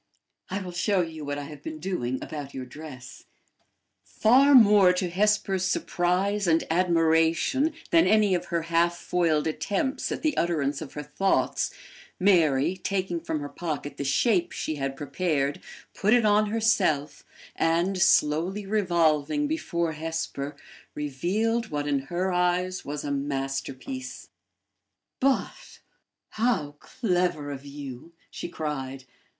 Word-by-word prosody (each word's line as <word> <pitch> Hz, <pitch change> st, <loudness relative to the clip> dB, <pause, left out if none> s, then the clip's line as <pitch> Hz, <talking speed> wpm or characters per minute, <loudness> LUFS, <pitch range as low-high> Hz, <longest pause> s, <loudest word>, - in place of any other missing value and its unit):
I 190 Hz, +1 st, -2 dB
will 180 Hz, -1 st, -6 dB
show 185 Hz, +2 st, +1 dB
you 160 Hz, -2 st, -5 dB
what 145 Hz, 0 st, -3 dB
I 145 Hz, -, -4 dB
have 145 Hz, 0 st, -10 dB
been 155 Hz, +1 st, -6 dB
doing 150 Hz, -8 st, -2 dB
about 145 Hz, -3 st, -7 dB
your 130 Hz, -1 st, -5 dB
dress." 130 Hz, -2 st, -11 dB, 0.8 s
Far 270 Hz, +5 st, +4 dB
more 205 Hz, -6 st, +7 dB
to 180 Hz, -1 st, -2 dB
Hesper's 195 Hz, -1 st, +1 dB
surprise 185 Hz, +2 st, 0 dB
and 165 Hz, -1 st, +3 dB
admiration 165 Hz, -, +2 dB, 0.2 s
than 330 Hz, 0 st, +5 dB
any 210 Hz, -2 st, +4 dB
of 180 Hz, -, -1 dB
her 170 Hz, -1 st, -2 dB
half 170 Hz, +1 st, +1 dB
foiled 165 Hz, -5 st, +1 dB
attempts 200 Hz, -, -2 dB
at -, -, -4 dB
the 305 Hz, -3 st, +1 dB
utterance 145 Hz, -4 st, 0 dB
of 150 Hz, -, -8 dB
her 150 Hz, -, -5 dB
thoughts, 190 Hz, +7 st, 0 dB, 0.5 s
Mary, 175 Hz, -4 st, +3 dB
taking 190 Hz, -3 st, -2 dB
from 160 Hz, -2 st, -3 dB
her 145 Hz, -, -4 dB
pocket 145 Hz, -2 st, -5 dB
the -, -, -3 dB
shape 245 Hz, -, +2 dB
she 155 Hz, -, -3 dB
had 135 Hz, -1 st, -3 dB
prepared, 145 Hz, -1 st, -1 dB, 0.3 s
put 210 Hz, +4 st, +3 dB
it 240 Hz, -2 st, +3 dB
on 210 Hz, 0 st, +4 dB
herself, 205 Hz, -10 st, +1 dB, 0.3 s
and, 175 Hz, +4 st, +1 dB
slowly 180 Hz, +3 st, +2 dB
revolving 175 Hz, -, +1 dB
before 170 Hz, -, -1 dB
Hesper, 155 Hz, -3 st, -4 dB, 0.4 s
revealed 200 Hz, -, -1 dB
what 145 Hz, -1 st, -2 dB
in 140 Hz, -1 st, +1 dB
her 185 Hz, +2 st, -1 dB
eyes 180 Hz, +1 st, 0 dB
was 145 Hz, 0 st, -5 dB
a 145 Hz, -, -3 dB
masterpiece. 140 Hz, -, -4 dB, 0.9 s
"But 270 Hz, 0 st, -1 dB, 0.5 s
how 215 Hz, -11 st, 0 dB
clever 180 Hz, -, -1 dB
of 140 Hz, 0 st, -8 dB
you!" 140 Hz, +2 st, -9 dB, 0.2 s
she -, -, -6 dB
cried. 135 Hz, -5 st, -4 dB
170 Hz, 135 wpm, -26 LUFS, 145-195 Hz, 0.9 s, more